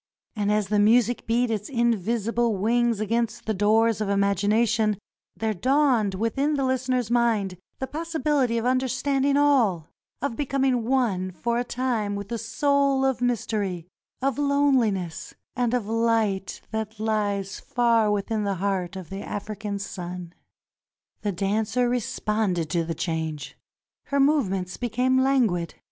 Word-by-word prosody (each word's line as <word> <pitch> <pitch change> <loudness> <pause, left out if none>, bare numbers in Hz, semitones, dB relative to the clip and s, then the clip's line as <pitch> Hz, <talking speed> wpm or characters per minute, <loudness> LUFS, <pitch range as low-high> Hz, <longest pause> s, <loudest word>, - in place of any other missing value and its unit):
And 205 -1 0
as 210 -2 +1
the 210 -1 +2
music 235 +3 +3
beat 235 +1 +1
its 210 -2 -3
invisible 230 -2 0
wings 235 +2 +1
against 230 +1 -1
the 220 - 0
doors 215 +2 +2
of 210 - -1
imagination 210 +2 +2 0.4
there 220 -1 -1
dawned 250 - +2
within 270 +9 0
the 275 -2 0
listener's 255 -2 0
mind 225 -6 +1 0.2
the 265 - -3
possibility 300 -5 0
of 230 - -2
understand 265 +2 +1
ing 280 0 +3
all 235 - +2 0.2
— - - -51
of 280 -5 -1
becoming 270 -4 0
one 225 -8 +1
for 235 +7 -2
a - - 0
time 240 -5 -1
with 200 0 -6
the 235 - -3
soul 275 +4 +1
of 265 -2 0
mystery, 210 -7 -1 0.4
of 275 0 0
lonehness, 260 - +1 0.2
and 245 -2 +1
of 245 -4 0
light 225 -3 0
that 220 -1 -3
Hes 205 -3 -1
far 235 -3 +2
witliin 210 +1 -1
the 200 -1 -1
heart 190 -1 -2
of 190 -1 -8
the 195 +1 -5
African 205 0 -5
sun. 180 -3 -6 0.9
The 205 - -1
dancer 210 +6 0
responded 210 -7 -1
to 170 -2 +1
the 165 0 -4
change. 160 -3 -3 0.5
Her 280 - -1
movements 195 -11 +1
became 250 +2 +1
languid. 235 - +1
225 Hz, 145 wpm, -25 LUFS, 200-250 Hz, 0.9 s, music